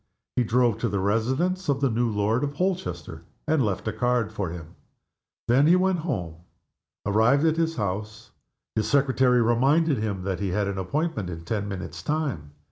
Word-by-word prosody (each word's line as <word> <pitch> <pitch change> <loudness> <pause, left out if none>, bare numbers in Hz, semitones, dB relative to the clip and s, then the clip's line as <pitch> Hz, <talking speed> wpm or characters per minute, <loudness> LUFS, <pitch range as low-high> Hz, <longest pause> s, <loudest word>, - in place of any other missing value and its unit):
He 125 - +3
drove 120 -1 +2
to 115 - 0
the 100 - -1
residence 130 - 0
of 140 -1 +2
the 135 -3 +1
new 120 +1 +1
Lord 110 +4 0
Holchester, 90 - -3 0.3
and 155 -3 +3
left 105 -1 -2
a 110 - -1
card 125 -3 0
for 100 -5 -3
him. 85 -1 -9 0.7
Then 135 +5 +4
he 175 - +6
went 185 -1 +2
home. 90 - -3 0.7
Arrived 110 +9 +3
at 160 0 +2
his 165 0 0
house, 105 +1 -4 0.4
his 110 - -1
secretary 130 -3 +3
reminded 135 +5 +3
him 100 -4 -3
that 95 -2 -2
he 100 -1 -1
had 100 +2 0
an 100 -1 -3
appointment 140 - -2
in 85 -1 -7
ten 100 +2 -2
minutes' 95 -2 -6
time. 140 - -2
115 Hz, 175 wpm, -25 LUFS, 100-140 Hz, 0.7 s, he